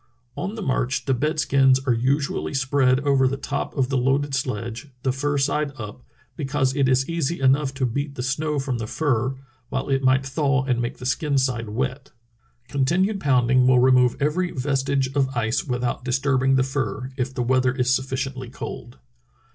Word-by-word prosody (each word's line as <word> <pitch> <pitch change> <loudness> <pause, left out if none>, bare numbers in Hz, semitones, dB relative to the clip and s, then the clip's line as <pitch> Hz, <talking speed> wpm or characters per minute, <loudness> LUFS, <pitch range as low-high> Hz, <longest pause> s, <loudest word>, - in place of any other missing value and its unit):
On 195 +4 -4
the 220 - -5
march 130 -3 -1
the 135 - +1
bed 150 +5 -1
skins 135 -3 +4
are 130 - +3
usually 135 +5 -1
spread 135 -1 +2
over 135 -2 +3
the 135 +2 -2
top 140 +2 -4
of 130 -2 +1
the 135 -2 +1
loaded 135 +3 +1
sledge, 120 -2 -3 0.2
the 130 - +2
fur 145 +3 -1
side 145 +1 0
up, 105 +1 -8 0.3
because 135 -3 -1
it 135 -3 +2
is 130 +1 +2
easy 165 -1 -2
enough 135 +1 +3
to 130 -1 0
beat 140 +4 -3
the 125 - -4
snow 150 +3 -1
from 135 -3 -2
the 110 - -4
fur, 130 -2 0 0.3
while 130 - -3
it 135 -1 +1
might 130 0 +3
thaw 135 -1 +1
and 125 -3 0
make 120 - -3
the 125 - -9
skin 145 +1 0
side 125 -4 0
wet. 130 +5 -3 0.6
Continued 175 +9 +1
pounding 125 -4 +3
will 130 -1 +5
remove 125 -1 +4
every 165 +6 0
vestige 135 -1 -1
of 135 -2 0
ice 110 +1 0
without 125 -3 -2
dis 125 0 0
turbing 135 -1 +2
the 130 - +3
fur, 130 -1 -3
if 130 -1 -2
the 125 -2 -2
weather 130 +1 +2
is 125 -1 +2
sufficiently 130 -1 -3
cold." 120 - -8
135 Hz, 185 wpm, -23 LUFS, 130-140 Hz, 0.6 s, will